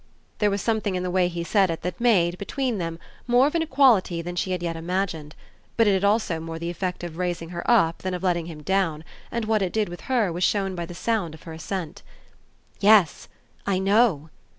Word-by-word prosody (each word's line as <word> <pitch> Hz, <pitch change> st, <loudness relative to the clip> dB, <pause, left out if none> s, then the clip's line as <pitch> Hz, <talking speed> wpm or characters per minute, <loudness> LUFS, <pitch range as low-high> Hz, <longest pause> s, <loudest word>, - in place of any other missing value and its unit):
There 210 Hz, -, +3 dB
was 200 Hz, 0 st, -2 dB
something 220 Hz, -4 st, 0 dB
in 180 Hz, -, -2 dB
the 180 Hz, -, -2 dB
way 180 Hz, -1 st, +3 dB
he 170 Hz, -1 st, -4 dB
said 195 Hz, +1 st, +2 dB
it 165 Hz, -, -4 dB
that 180 Hz, +5 st, -4 dB
made, 180 Hz, -7 st, +3 dB
between 245 Hz, +1 st, -2 dB
them, 165 Hz, -1 st, -3 dB, 0.3 s
more 245 Hz, +2 st, +5 dB
of 295 Hz, -, 0 dB
an 335 Hz, -, +1 dB
equality 250 Hz, -, +3 dB
than 175 Hz, +1 st, -5 dB
she 175 Hz, -, -1 dB
had 180 Hz, -1 st, -2 dB
yet 170 Hz, -1 st, -2 dB
imagined; 165 Hz, -3 st, -3 dB, 0.4 s
but 230 Hz, -, +5 dB
it 205 Hz, -, +4 dB
had 190 Hz, 0 st, 0 dB
also 200 Hz, -5 st, +1 dB
more 165 Hz, 0 st, -6 dB
the 170 Hz, +1 st, -4 dB
effect 180 Hz, 0 st, -4 dB
of 170 Hz, -2 st, -6 dB
raising 175 Hz, -2 st, -2 dB
her 170 Hz, -1 st, -5 dB
up 185 Hz, -9 st, +3 dB
than 185 Hz, -1 st, -3 dB
of 180 Hz, -, -6 dB
letting 170 Hz, -3 st, 0 dB
him 155 Hz, -3 st, -9 dB
down, 165 Hz, -3 st, 0 dB, 0.3 s
and 235 Hz, -2 st, -2 dB
what 215 Hz, -1 st, +1 dB
it 185 Hz, -2 st, 0 dB
did 215 Hz, -4 st, 0 dB
with 175 Hz, 0 st, -8 dB
her 225 Hz, -9 st, +2 dB
was 175 Hz, +2 st, -2 dB
shown 195 Hz, -1 st, +1 dB
by 170 Hz, -2 st, -5 dB
the 175 Hz, -, -9 dB
sound 185 Hz, -6 st, -1 dB
of 160 Hz, -, -16 dB
her 165 Hz, -, -8 dB
assent. 165 Hz, +1 st, -5 dB, 0.8 s
"Yes 205 Hz, -6 st, +4 dB, 0.4 s
I 195 Hz, -2 st, +2 dB
know!" 190 Hz, -6 st, +2 dB
185 Hz, 225 wpm, -24 LUFS, 170-210 Hz, 0.8 s, more